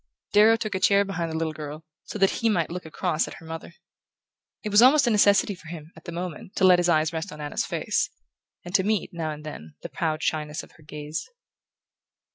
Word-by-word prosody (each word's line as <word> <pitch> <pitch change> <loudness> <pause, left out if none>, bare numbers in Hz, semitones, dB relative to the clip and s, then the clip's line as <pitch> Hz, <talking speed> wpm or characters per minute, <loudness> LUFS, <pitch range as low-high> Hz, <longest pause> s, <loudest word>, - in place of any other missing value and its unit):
Darrow 215 +2 +7
took 215 -1 -3
a 190 - -1
chair 200 +1 +4
behind 170 -4 -3
the 160 - -2
little 160 -1 -1
girl, 155 +1 -8 0.2
so - - -6
that 195 -1 +2
he 230 - +3
might 170 -6 0
look 180 -1 -6
across 160 0 -1
at - - -8
her 165 - -13
mother. 165 +1 -8 0.9
It 210 - -2
was 205 +2 +6
almost 280 +3 +7
a 240 - +2
necessity 205 -1 +4
for 170 -4 -14
him, 160 -1 -9
at - - -15
the 170 - -6
moment, 175 +1 -6
to - - -1
let 180 -1 +7
his 175 0 +2
eyes 155 -1 +2
rest 165 +4 -4
on 150 - -10
Anna's 150 -1 -2
face, - - 0 0.6
and 175 - -8
to 190 - +4
meet, 210 -2 0
now 165 -2 -3
and 150 0 -6
then, 80 - -9
the - - -5
proud 155 -3 -2
shyness 150 -1 -2
of - - -15
her 155 - -20
gaze. 150 +1 -6
170 Hz, 230 wpm, -25 LUFS, 155-200 Hz, 0.9 s, Darrow